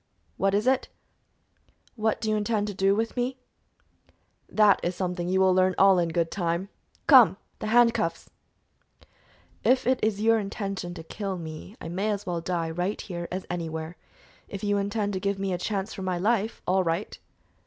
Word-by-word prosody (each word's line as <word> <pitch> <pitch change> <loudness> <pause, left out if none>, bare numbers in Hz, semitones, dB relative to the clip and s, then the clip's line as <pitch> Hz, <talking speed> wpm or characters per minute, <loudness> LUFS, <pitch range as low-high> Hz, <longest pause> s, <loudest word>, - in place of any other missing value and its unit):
"What 195 0 +2
is 210 +2 +1
it?" 260 0 +2 1.1
"What 220 -1 0
do 220 -1 -1
you - - +2
intend 210 -1 -1
doing 195 +1 +2
with 225 +1 -1
me?" 250 +1 -1 1.1
"That 210 -2 +5
is 175 +1 -2
something 180 -1 -2
you 190 +1 +2
will 190 -1 +5
learn 185 0 +3
all 195 -1 +6
in 170 -1 +1
good 165 0 0
time. 175 0 -2 0.4
Come! - - +7 0.2
the 215 - -4
handcuffs!" 230 -7 +2 1.4
"If 255 0 +3
it 255 0 +2
is 215 -2 +1
your 225 +1 +4
intention 195 -3 -4
to 165 - -8
kill 195 +3 -4
me, 160 +4 -8
I - - -7
may 190 +6 -2
as 205 -1 -2
well 175 -2 -2
die 165 -2 -2
right 180 +5 -2
here 175 -3 -5
as 185 +1 -4
anywhere; 160 -1 -4 0.5
if 200 0 -7
you 205 -1 +1
intend 205 0 -1
to 190 - -2
give 200 +1 -1
me 195 -1 -2
a 175 - -2
chance 200 +2 -2
for 195 - -7
my 185 -1 -1
life, 220 +3 0
all 185 +1 +2
right." 170 +4 -2
195 Hz, 180 wpm, -26 LUFS, 175-210 Hz, 1.4 s, Come